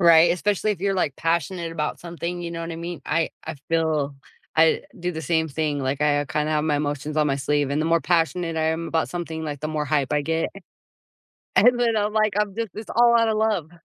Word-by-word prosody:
Right, 170 -1 +7
especially 205 +3 0
if 195 - -9
you're 195 0 +1
like 150 -7 0
passionate 170 +1 -1
about 150 -2 -3
something, 175 +1 -5
you 170 - -4
know 165 0 -5
what 165 - -5
I - - -6
mean, 170 +1 -6
I 165 -1 +1 0.2
I - - -4
feel 155 -4 0 0.4
I 160 0 +4 0.2
do 175 +1 -2
the 160 - -5
same 160 -1 +1
thing, 150 0 -1
like, 135 +1 -2
I, 145 -1 +3
uh, - - -2
kind 150 +2 -1
of - - 0
have 150 0 +1
my 150 -2 +1
emotions 145 +1 -3
on 150 - +3
my 135 - +1
sleeve, 145 0 0
and 145 +2 0
the 160 - 0
more 165 0 +3
passionate 165 0 0
I 160 - +1
am 160 +1 -1
about 165 -1 0
something, 165 -2 -4
like, 145 -2 -4
the 155 - -2
more 155 -1 -1
hype 145 -2 0
I 150 - +2
get. 160 +2 0 1.1
And 245 0 +6
then 230 -2 +2
I'm, 210 0 +1
like, 215 -2 +2
I'm 205 -2 -1
just 230 -2 -2
it's 215 0 -8
all 235 0 +5
out 230 - +3
of 220 - +1
love. 210 -8 0
165 Hz, 245 wpm, -24 LUFS, 150-180 Hz, 1.1 s, Right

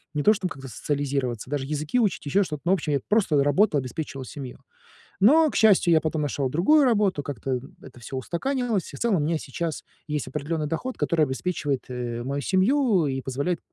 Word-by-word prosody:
не 145 - 0
то 215 - +6
чтоб 190 -3 -3
как-то 135 -2 -9
социализироваться, 135 -2 -2
даже 140 -2 -1
языки 150 - -1
учить, 205 -9 0
еще 145 +8 +2
что-то. 150 -5 -6
Ну 180 - +2
в - - +6
общем, 155 -4 -2
я 140 - +2
просто 185 -10 +3
работал, 145 +2 +3
обеспечивал 135 +1 -5
семью. 130 -2 -8 0.6
Но, 300 +9 +5
к - - -5
счастью, 200 -6 +5
я 160 - +5
потом 155 0 -2
нашел 140 -2 -1
другую 200 - +4
работу. 205 - +2
Как-то, 135 -1 -5
м, 125 +2 -10
это 120 - -13
всё 130 +3 -7
устаканилось 225 - -2
и, - - -6
в - - -13
целом, 230 -5 +2
у - - +1
меня 160 +3 0
сейчас 155 +3 -4 0.2
есть 150 -1 -2
определенный 150 +3 -3
доход, 245 +12 -3
который 160 -3 +2
обеспечивает, 140 -1 -2
э, 120 -2 -4
мою 140 +3 -3
семью, 195 - +2
и 135 -1 -2
позволяет 140 +7 -2
150 Hz, 205 wpm, -25 LUFS, 135-190 Hz, 0.6 s, то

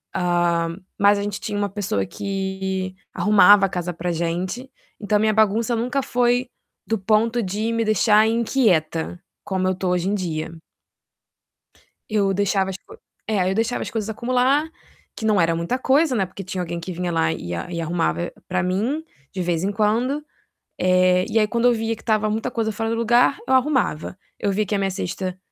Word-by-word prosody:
hã, 175 -2 +1 0.2
mas 200 0 +5
a 200 - -2
gente 205 -1 -3
tinha 205 -1 -3
uma 205 0 0
pessoa 195 - -2
que 190 - -3 0.2
arrumava 205 -1 +6
a - - -10
casa 180 -1 -3
pra 175 +2 -3
gente, 175 +9 -3 0.3
então 210 0 +1
minha 215 0 +2
bagunça 220 +2 +2
nunca 250 +4 -1
foi 245 +1 +1 0.4
do 225 - 0
ponto 225 +4 +2
de 210 +4 -2
me 230 -1 0
deixar 215 +1 +4
inquieta, 195 - +1 0.2
como 185 -1 -1
eu 185 - +1
tô 185 0 -2
hoje 180 +1 0
em 205 - +1
dia. 165 -4 -3 1.6
Eu 200 -2 +1
deixava 195 0 +1
as 190 - -5
co 430 - -16 0.3
é, 195 -4 +1
eu 190 - -1
deixava 230 +3 0
as - - -5
coisas 220 -3 -3
acumular, 255 +6 +1 0.5
que 220 - -5
não 215 -2 +3
era 165 -1 +3
muita 170 +9 -1
coisa, 275 +1 +3
né, 195 - +1
porque 190 +2 -9
tinha 185 0 -4
alguém 170 -1 -4
que 175 +2 -6
vinha 175 0 -3
lá 165 -1 +1
e 90 - -5
a 85 - -5
e 170 - -3
arrumava 170 +1 -1 0.2
pra 185 -1 0
mim 220 +12 -1 0.3
de 190 - -4
vez 170 -1 -1
em 200 - 0
quando. 235 +8 0 0.6
Eh, 185 0 +3
e 225 - +2
aí 215 - +3
quando 235 +2 0
eu - - +5
via 225 0 -1
que 220 - -16
estava 215 -1 +1
muita 225 +3 -2
coisa 225 -2 -1
fora 225 +1 -2
do 230 - 0
lugar, 240 +4 +3
eu - - 0
arrumava. 255 - +1 0.2
Eu 200 - 0
via 210 +2 +1
que 205 - -2
a - - +1
minha 195 -1 0
cesta 185 0 -4
200 Hz, 195 wpm, -22 LUFS, 180-225 Hz, 1.6 s, arrumava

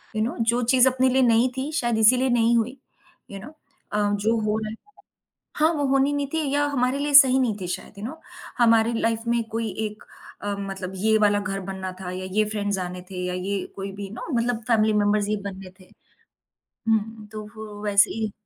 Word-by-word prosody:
You 215 - 0
know 230 - -2 0.2
जो 240 +1 0
चीज़ 255 0 +6
अपने 260 0 +2
लिए 260 +1 +3
नहीं 235 +1 +4
थी 270 +3 -3
शायद 240 -6 0
इसीलिए 250 +4 +4
नहीं 235 -1 +3
हुई। 240 +4 -1 0.5
यू 200 - -7
नो 230 +9 -10 0.4
अ, - - +1 0.2
जो 210 +3 +1
हो 215 0 0
रहा 215 -1 -4
है 220 - -6 0.8
हाँ, 315 +2 +3
वो 290 -3 -1
होनी 270 +1 +3
नहीं 285 -1 -1
थी 320 - +1
या 290 0 +2
हमारे 255 0 0
लिए 290 0 -2
सही 265 -2 +8
नहीं 240 -5 +1
थी 180 - -4
शायद 180 +1 -6
यू - - -8
नो। 315 +7 -7 0.4
हमारी 230 -1 +4
लाइफ 225 0 0
में 235 0 +1
कोई 225 0 -2 0.2
एक 210 0 -12 0.4
अ, 205 0 -2
मतलब 195 -1 -5
ये 220 +3 +3
वाला 205 -1 +3
घर 200 -1 -3
बनना 190 -1 -5
था 180 -1 -5
या 185 +1 -5
ये 215 +2 +2
फ्रेंड्स 205 -2 -2
आने 180 0 -5
थे 180 -1 -4
या 180 - -2
ये 190 +1 -3
कोई 195 0 -5
भी 200 0 -7
नो 215 - -8
मतलब 235 -1 0
फैमिली 220 -2 +3
मेंबर्स 205 0 +2
ही 215 - 0
बनने 190 -2 -7
थे। 185 - -18 1.0
हुँ, 220 0 0
तो 215 0 -7
वो 210 -1 -9
वैसे 205 -1 +4
ही 220 -2 -3
220 Hz, 215 wpm, -24 LUFS, 200-245 Hz, 1.0 s, सही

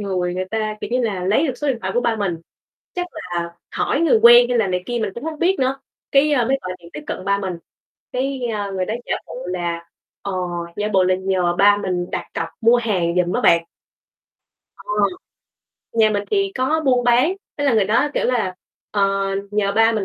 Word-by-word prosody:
người 180 -3 -1
người 185 +1 -2
ta, 215 +1 -2
kiểu - - -5
như 250 - +1
là, 200 -6 -1
lấy 220 - +2
được 260 - -2
số 295 - -1
điện 250 -4 0
thoại - - -3
của 245 - +3
ba 235 -2 0
mình, 195 -5 -1 0.6
chắc 355 0 -2
là 170 -1 -5 0.2
hỏi 280 - 0
người 320 -9 +4
quen 240 +1 +9
hay 245 -1 +1
là 220 - +3
này 180 -1 -1
kia, 240 -1 -2
mình 205 - -1
cũng 235 - -7
hông 315 -2 -4
biết 370 +2 +2
nữa, 265 +1 0 0.3
cái, 285 +2 +4
ơ, 245 -5 +2
mới 270 +1 +2
gọi 185 0 -4
điện 170 0 -15
tiếp 150 - -6
cận 185 - -5
ba 200 0 +1
mình, 190 -3 -3 0.6
cái, 265 +1 -2
a, 205 -1 -3
người 190 -1 -1
đó 220 - -2
giả - - 0
bộ 165 - -9
là, 170 -2 -3 0.4
ờ, 200 - -4 0.4
giả 210 +1 -1
bộ 190 -1 +4
là 185 - +3
nhờ 185 -2 0
ba 205 0 +6
mình 180 -3 -2
đặt - - -3
cọc 165 - -2
mua 230 +2 +5
hàng 185 -8 0
giùm 180 0 +2
á - - 0
bạn. 170 -1 +4 1.1
Ờ, - - -15 1.1
nhà 220 -1 +4
mình 205 -1 0
thì 395 -1 +1
có 265 +5 +1
buôn 250 -3 +3
bán, 250 +8 +4 0.3
thế 285 - 0
là 275 - +3
người 215 -3 +4
đó, 225 +8 +2
kiểu - - +1
là, 225 -7 0 0.4
ờ, 205 - 0 0.5
nhờ 205 -1 0
ba 225 +1 +5
mình 215 -3 -1
215 Hz, 225 wpm, -21 LUFS, 185-250 Hz, 1.1 s, quen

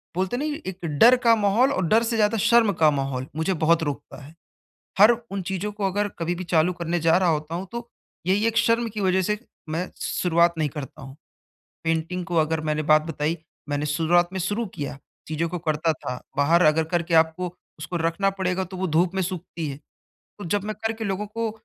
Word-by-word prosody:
बोलते 190 +5 -1
है - - -2
ना 300 - -2
ये 305 +1 -3
एक 185 -2 -6
डर 245 +2 +8
का 230 -1 +6
माहौल 220 +6 +3
और 185 -7 0
डर 225 +5 +4
से 230 0 -1
ज़्यादा 215 +1 +2
शर्म 225 0 +4
का 155 -1 +4
माहौल, 135 -2 -2
मुझे 160 +4 0
बहुत 165 0 +2
रोकता 145 0 -5
है। 150 +4 -13 0.7
हर 210 +3 +8 0.2
उन 195 -1 -3
चीज़ों 195 +3 -3
को 205 -1 -2
अगर 205 +2 0
कभी 170 +1 -1
भी 180 +1 -6
चालू 170 +1 +2
करने 170 0 -2
जा 165 +1 +4
रहा 185 -2 +2
होता 155 +1 -1
हूँ, 185 +3 -4
तो 235 0 -6 0.4
यही 205 +4 +2
एक 230 0 0
शर्म 230 0 +2
की 215 -1 -6
वज़ह 190 -1 +2
से 210 +3 -1 0.3
मैं 165 +4 -3
शुरुआत 170 -1 +2
नहीं 155 -2 +1
करता 135 -1 -8
हूँ। 135 +1 -10 0.7
पेंटिंग 165 +2 -1
को 175 - -3
अगर 160 0 +2
मैंने 155 0 -1
बात 155 0 +4
बताई, 160 +1 -2 0.3
मैंने 145 +1 -1
शुरुआत 170 +3 +2
में 190 - -3
शुरू 210 +5 -1
किया, 140 -1 -5 0.3
चीज़ों 160 +2 -1
को 180 +1 -4
करता 160 0 0
था, 125 -4 -6 0.2
बाहर 165 +5 +4
अगर 160 +1 +3
करके 170 -1 0
आपको 165 +2 +2 0.2
उसको 175 +3 -5
रखना 170 +4 +1
पड़ेगा 190 -1 -1
तो 185 +1 -9
वो 190 +1 -1
धूप 170 +4 +2
में 190 - 0
सूखती 170 -3 -4
है, 135 - -5 0.6
तो 205 - -7
जब 205 +4 -1
मैं 215 0 -3
करके 225 0 -2
लोगों 200 +1 -2
को 225 +1 -3
175 Hz, 215 wpm, -24 LUFS, 160-205 Hz, 0.7 s, डर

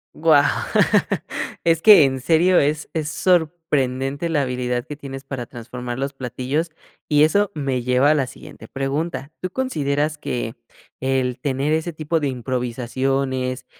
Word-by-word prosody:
Guau, 155 -3 +5 1.2
es 165 -1 +2
que 210 -7 +9
en 130 -1 -1
serio, 170 +5 +4
es 150 +1 0
es 155 -2 -2
sorprendente 155 -5 0
la 150 -4 +1
habilidad 125 -1 -2
que 150 - -7
tienes 135 -1 -8
para 125 -3 -6
transformar 120 0 -7
los 140 +1 -3
platillos 130 +5 -3 0.4
y 150 0 +5
eso 200 +6 +3
me 135 -4 -1
lleva 125 +4 +3
a - - +5
la 140 -4 0
siguiente - - -12
pregunta, 140 +1 -3
¿tú 185 - -2
consideras 150 - -1
que 120 -5 -3 0.5
el 130 -1 0
tener 140 +2 0
ese 160 +1 -1
tipo 155 +1 -1
de 145 - -1
improvisaciones, 130 +1 -2
140 Hz, 145 wpm, -21 LUFS, 130-155 Hz, 1.2 s, que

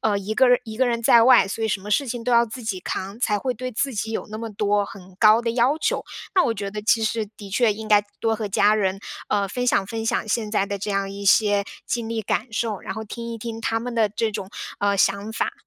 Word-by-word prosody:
呃， 205 -2 +1
一 205 +2 -4
个 260 +2 +5 0.2
一 220 -1 -8
个 260 0 +2
人 235 -1 -1
在 230 0 +6
外， 250 -4 +6
所 225 +3 -4
以 - - 0
什 195 -1 -1
么 205 +2 -8
事 280 +6 +2
情 240 -1 -4
都 250 - 0
要 235 0 +6
自 235 +2 -8
己 190 -4 -3
扛， 195 +4 -5
才 210 -4 +1
会 255 +3 -2
对 255 +3 -5
自 250 +2 -2
己 220 +2 -3
有 - - -3
那 215 - -5
么 230 -1 -5
多 205 0 +1
很 190 -2 -12
高 215 +1 +6
的 235 - -1
要 255 +6 +2
求， - - -1 0.3
那 365 - +5
我 230 - +1
觉 200 0 -4
得 210 0 -6
其 225 +1 +3
实 220 -1 -1
的 200 -2 -10
确 220 +1 +3
应 220 +1 -8
该 210 -1 +5 0.2
多 225 -1 +1
和 215 -2 -4
家 205 +2 +4
人， 195 -2 0 0.3
呃， 200 -1 +1
分 250 +4 -3
享 195 -5 +2
分 225 +1 -4
享 225 - 0
现 215 -1 -1
在 200 -2 +1
的 200 - -3
这 205 +2 -4
样 195 0 -1
一 200 0 -7
些 205 0 +4 0.2
经 235 -2 -2
历 225 -1 -2
感 225 +3 -2
受， 220 -3 -2
然 - - -5
后 220 0 -5
听 235 +2 -6
一 230 - -6
听 225 0 -6
他 225 0 0
们 245 0 -5
的 220 -2 +3
这 220 +2 -1
种， 195 -1 -5 0.3
呃， 200 0 +2
想 200 +3 +1
法。 - - -1
220 Hz, 290 characters per minute, -23 LUFS, 205-235 Hz, 0.3 s, 在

